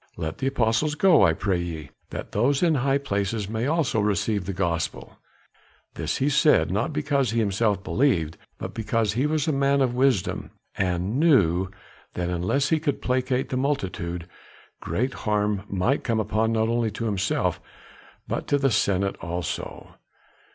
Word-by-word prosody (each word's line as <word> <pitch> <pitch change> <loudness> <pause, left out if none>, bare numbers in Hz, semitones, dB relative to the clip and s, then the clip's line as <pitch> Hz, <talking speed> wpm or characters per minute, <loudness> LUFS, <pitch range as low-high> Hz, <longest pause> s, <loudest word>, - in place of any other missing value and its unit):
Let 80 0 -4
the 135 - -1
apostles 135 +3 +1
go, 180 0 +5
I 80 - +5
pray 95 +1 -1
ye, 80 -5 -6 0.2
that - - -6
those 135 - +2
in 170 -2 +4
high 135 0 +2
places 100 -5 -2
may 110 +4 -2
also 160 -7 +1
receive 105 -1 0
the 100 - -2
Gospel." 85 -3 -3 0.7
This - - -2
he 135 - +1
said, 145 - +4
not - - 0
because 135 - 0
he 115 - 0
himself 100 -1 +1
believed, 85 - +1 0.2
but - - -6
because 110 -1 0
he 130 +6 +1
was 155 -1 0
a - - +3
man 140 0 +2
of 130 -3 +2
wisdom, 125 -7 +1 0.3
and 95 +6 -1
knew 95 - +3 0.5
that 90 0 -2
unless 90 +11 0
he 160 - +2
could 150 -3 -1
placate 130 0 0
the 130 - -1
multitude, 90 - -2 0.5
great 125 - -2
harm 105 -2 -1
might 100 +9 0
come 115 -3 0
not 105 -1 -3 0.3
only 115 -1 +1
to 115 - -5
himself 100 -3 0 0.7
but - - -3
to 145 - +3
the 135 -2 +2
senate 100 -2 +1
also. 85 +1 -5
110 Hz, 160 wpm, -25 LUFS, 95-135 Hz, 0.7 s, go